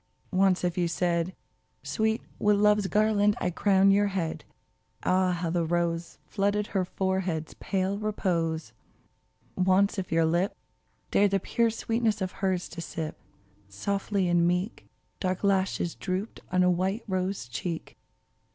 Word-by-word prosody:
Once 185 -1 +3
if 180 0 0
you 175 - +2
said, 170 +2 0 0.5
Sweet, 220 0 0 0.2
with 210 0 +4
Love's 210 -1 +4
garland 210 0 +3
I 180 - 0
crown 195 +2 +4
your 205 +1 +4
head," 170 -5 -3 0.6
Ah! 185 0 +3
how 175 -1 -2
the 170 0 +1
rose 170 0 -1
Flooded 205 +1 0
her 190 -2 +2
forehead's 190 -4 -2
pale 195 +1 -1
repose! 165 - -1 0.8
Once 190 +2 +3
if 185 - -5
your 165 0 +3
lip 175 +5 +1 0.6
Dared 205 0 +4
the 195 0 +1
pure 230 +5 +1
sweetness 225 -1 0
of 185 -2 -2
hers 185 -2 -1
to 170 - -7
sip, 160 -1 -5 0.5
Softly 195 - -1
and 175 -1 +3
meek 180 +5 -1 0.3
Dark 185 0 -2
lashes 190 -3 +1
drooped 190 +3 -4
on 185 0 +3
a 180 - +4
white 190 +6 0
rose 185 -7 -2
cheek 165 +6 -5
185 Hz, 140 wpm, -28 LUFS, 175-200 Hz, 0.8 s, with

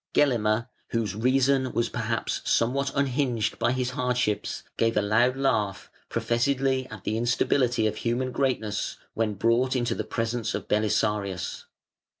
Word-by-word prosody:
Gelimer, 115 -5 +2 0.2
whose 115 -4 -1
reason 130 +2 +2
was 120 - +1
perhaps - - -2
somewhat 135 +4 +1
unhinged 130 -5 0
by 120 - +2
his 125 -1 -1
hardships, 125 -4 -1
gave 115 -1 +1
a - - +4
loud 120 +5 +3
laugh 110 -8 0 0.2
professedly 130 +3 +1
at 110 -5 -10
the 110 - -1
instability 120 0 +2
of 110 0 0
human 125 +3 -1
greatness 120 -7 -1 0.2
when 110 -2 -1
brought 120 +6 +2
into 120 -2 +1
the - - -3
presence 115 -1 -2
of - - -5
Belisarius. 105 -3 0
120 Hz, 140 wpm, -26 LUFS, 110-130 Hz, 0.2 s, a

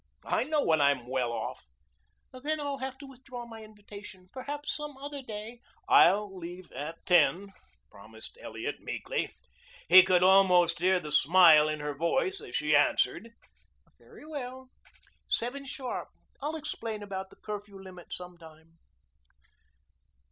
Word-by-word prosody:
I - - +1
know 300 0 +1
when 160 -2 +3
I'm 140 -3 +2
well 125 -2 -1
off." 120 - -5 0.7
"Then 295 +5 -3
I'll 285 -2 -3
have 265 0 -5
to 280 - -11
withdraw 255 -2 -10
my 225 -1 -10
invitation. 205 -3 -13
Perhaps 290 +3 -4
some 295 -2 -7
other 285 +1 -6
day 225 0 -8
" - - -36
"I'll 195 +2 +5
leave 175 0 -9
at 150 +5 -7
ten," 180 +3 +3 0.4
promised 110 +2 -9
Elliot - - -5
meekly. - - -4 0.5
He 185 +2 +11
could 180 -1 +3
almost 180 -3 +5
hear 185 +1 +3
the 150 -4 -8
smile 155 0 +6
in 155 -1 -3
her 150 0 -3
voice 265 - 0
as - - -9
she 150 0 +2
answered. 145 - +2 0.7
"Very - - -16
well. 260 -4 -7 0.6
Seven 265 +4 -1
sharp. 265 -2 -5 0.3
I'll 300 +3 -3
explain 230 -9 -5
about 190 -1 -6
the - - -18
curfew 205 -2 -8
limit 185 -2 -12
sometime." 165 -2 -10
195 Hz, 140 wpm, -29 LUFS, 165-260 Hz, 0.7 s, He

